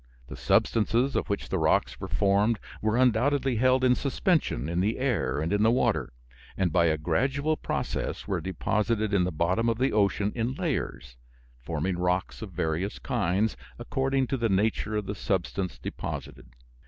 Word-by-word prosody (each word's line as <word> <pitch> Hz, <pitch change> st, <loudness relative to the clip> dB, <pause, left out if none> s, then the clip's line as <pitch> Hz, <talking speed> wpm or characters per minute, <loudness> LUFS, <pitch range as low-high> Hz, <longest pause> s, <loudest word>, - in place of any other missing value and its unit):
The -, -, -7 dB
substances 115 Hz, +4 st, +2 dB
of -, -, 0 dB
which 100 Hz, -, -2 dB
the -, -, 0 dB
rocks -, -, +1 dB
were -, -, -5 dB
formed 100 Hz, +7 st, +2 dB, 0.2 s
were 110 Hz, +2 st, +1 dB
undoubtedly 130 Hz, +1 st, +2 dB
held 130 Hz, +2 st, +3 dB
in 125 Hz, -1 st, +5 dB
suspension 140 Hz, -, 0 dB
in 85 Hz, +1 st, -1 dB
the 105 Hz, +5 st, +1 dB
air 110 Hz, -, 0 dB
and 80 Hz, +5 st, -1 dB
in 105 Hz, -, +2 dB
the 110 Hz, -, +5 dB
water, 120 Hz, -, +1 dB, 0.5 s
and 90 Hz, -4 st, 0 dB
by 85 Hz, -2 st, +4 dB
a 80 Hz, -1 st, +2 dB
gradual 135 Hz, -, 0 dB
process -, -, -3 dB
were -, -, -1 dB
deposited 105 Hz, +3 st, -1 dB
in 90 Hz, -3 st, +3 dB
the 90 Hz, -, -2 dB
bottom 90 Hz, +9 st, +1 dB
of 115 Hz, -, 0 dB
the 130 Hz, +2 st, +1 dB
ocean 105 Hz, 0 st, +2 dB
in 120 Hz, +2 st, -2 dB
layers, 60 Hz, -, -3 dB, 0.4 s
forming 85 Hz, +7 st, -2 dB
rocks 90 Hz, +2 st, -1 dB
of 110 Hz, -3 st, -7 dB
various 85 Hz, +3 st, -2 dB
kinds, 105 Hz, -1 st, 0 dB, 0.2 s
according 135 Hz, +2 st, 0 dB
to 135 Hz, -, -2 dB
the 115 Hz, -2 st, 0 dB
nature 105 Hz, +2 st, 0 dB
of 105 Hz, -1 st, -1 dB
the 100 Hz, -, -3 dB
substance 95 Hz, -1 st, -2 dB
deposited. -, -, -6 dB
105 Hz, 170 wpm, -27 LUFS, 90-125 Hz, 0.5 s, in